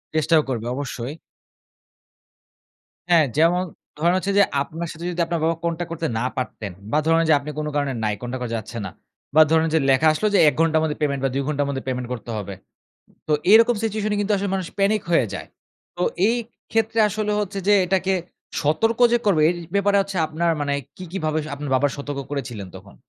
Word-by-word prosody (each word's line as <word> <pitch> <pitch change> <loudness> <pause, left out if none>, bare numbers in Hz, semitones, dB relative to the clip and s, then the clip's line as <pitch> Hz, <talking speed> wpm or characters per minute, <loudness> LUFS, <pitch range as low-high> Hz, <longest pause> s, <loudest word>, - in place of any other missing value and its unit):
চেষ্টাও 155 +1 +4
করবে। 115 -2 -3
অবশ্যই। 135 -1 -5 2.0
হ্যাঁ। 165 -3 +6
যেমন 175 +3 +4 0.4
ধরেন 170 +2 +3
হচ্ছে 195 +2 -1
যে, 200 - +7 0.2
আপনার 165 +4 -4
সাথে 165 +2 -8
যদি 175 0 -2
আপনার 170 -1 -1
বাবা 165 - +1
contact 170 0 -2
করতে 165 -1 -2
না 125 - -1
পারতেন। 110 -6 -4 0.2
বা 150 - +2
ধরেন 165 0 +4
যে 155 - +7
আপনি 140 +2 -8
কোন 150 - -2
কারণে 145 -2 0
নাই 105 -1 +1
contact 125 +1 -5
করা 120 -2 -3
যাচ্ছে 110 +2 -7
না 95 - -6 0.4
বা 155 - +8
ধরুন 160 0 +4
যে - - +5
লেখা 135 +4 +4
আসলো 215 +8 0
যে - - +5
১ - - -4
ঘন্টার 160 -1 +3
মধ্যে 150 -2 -1
payment 140 -3 0
বা - - +2
২ 140 - -1
ঘন্টার 145 -1 0
মধ্যে 135 -1 -3
payment 125 -1 -2
করতে 120 -1 -8
হবে। 100 -1 -5 0.8
তো 155 - +2 0.2
এরকম 230 +2 +7
situation 215 -1 -1
এ - - -1
কিন্তু 205 +1 0
আসলে 200 0 -2
মানুষ 190 -2 -2
panic 200 +1 +2
হয়ে 135 -8 +4
যায়। - - -6 0.5
তো 175 - -2 0.3
এই 235 - +2 0.4
ক্ষেত্রে 225 0 +1
আসলে 210 0 -2
হচ্ছে 200 -1 -3
যে, 205 - +7
এটাকে 190 +1 +1 0.5
সতর্ক 225 +11 +1
যে 240 - +4
করবে 185 -6 +4
এই 175 - +1 0.2
ব্যাপারে 200 0 +3
হচ্ছে 195 0 -3
আপনার 165 +2 0
মানে 145 -1 -1 0.2
কী, 185 - -8
কী 195 - -2
ভাবে 155 0 +1 0.2
আপনার 140 -1 -6
বাবাকে 140 +1 +2
সতর্ক 140 0 -5
করেছিলেন 120 -8 -4
তখন? - - -14
160 Hz, 205 wpm, -22 LUFS, 140-195 Hz, 2.0 s, বা